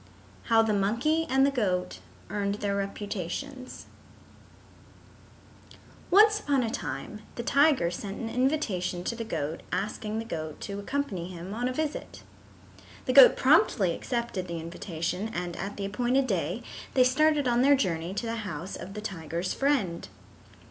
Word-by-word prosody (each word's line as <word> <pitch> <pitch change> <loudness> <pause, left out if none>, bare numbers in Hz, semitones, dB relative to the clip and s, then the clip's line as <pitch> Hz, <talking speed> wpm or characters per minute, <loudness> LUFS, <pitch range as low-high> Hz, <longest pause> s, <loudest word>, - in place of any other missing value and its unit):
IX - - -13
How 225 -1 +6
the 220 -1 +1
Monkey 235 +12 +1
and 270 +1 +4
the 280 - +2
Goat 190 -9 -1 0.3
Earned 200 -1 -1
Their 205 -1 -2
Reputations 205 +6 -5 2.2
Once 425 +3 +6
upon 280 -8 +1
a 225 - -2
time 210 -1 -5
the 235 - -4
tiger 280 - +3
sent 195 +3 -6
an 230 - -3
invitation 225 - 0
to 235 - -2
the 230 - -4
goat 160 -6 -3
asking 210 +3 -2
the 225 - -3
goat 155 -7 -5
to 200 -1 -5
accompany 205 -7 -3
him 180 +2 -7
on 240 +3 -1
a - - -1
visit. 310 +2 -4 0.8
The - - 0
goat - - +9
promptly 195 - +4
accepted 235 -6 -3
the 170 -1 -4
invitation 170 +4 -4
and 175 -1 -3
at 195 +2 -5
the 200 - -3
appointed 245 +6 +1
day 185 - -1 0.3
they 255 - +6
started 290 +2 +3
on 240 0 +3
their 280 +2 +6
journey 175 -6 -1
to 235 - -2
the 230 0 -2
house 185 -4 -5
of 190 +4 -8
the 210 - -5
tiger's 170 -3 -3
friend. 255 -12 0
210 Hz, 155 wpm, -28 LUFS, 180-255 Hz, 2.2 s, goat